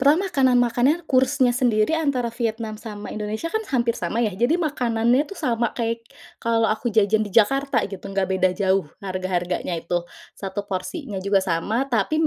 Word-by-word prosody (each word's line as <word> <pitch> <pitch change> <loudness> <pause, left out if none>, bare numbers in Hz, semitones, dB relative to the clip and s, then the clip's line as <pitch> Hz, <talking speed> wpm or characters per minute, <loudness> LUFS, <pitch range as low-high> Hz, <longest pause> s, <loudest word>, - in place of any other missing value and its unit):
Pernah 310 +9 +4
makanan 260 -6 +3
makannya, 245 +6 +3
kursnya 260 -1 +3
sendiri 245 +4 +2
antara 275 -6 0
Vietnam 225 -2 -3
sama 210 -2 -8
Indonesia 215 +9 -4
kan 440 +4 -2
hampir 235 -2 +1
sama, 230 - -2
ya. 230 - +2
Jadi 285 - +2
makanannya 245 -3 +1
tuh 390 +5 -10
sama 235 -1 0
kayak 230 -1 -2 0.3
kalau 230 -1 +1
aku 220 +2 -1
jajan 215 0 +3
di 205 - -9
Jakarta, 270 +3 +3
gitu, 195 -2 -9
nggak 195 -1 0
beda 185 -1 +2
jauh, 190 -1 +1 0.2
harga-harganya 185 -2 -2
itu, 175 +1 -2 0.3
1 200 +1 -5
porsinya 200 - -4
juga 200 -1 +3
sama, 195 +9 -1
tapi 250 +6 +1
230 Hz, 165 wpm, -23 LUFS, 200-260 Hz, 0.3 s, Pernah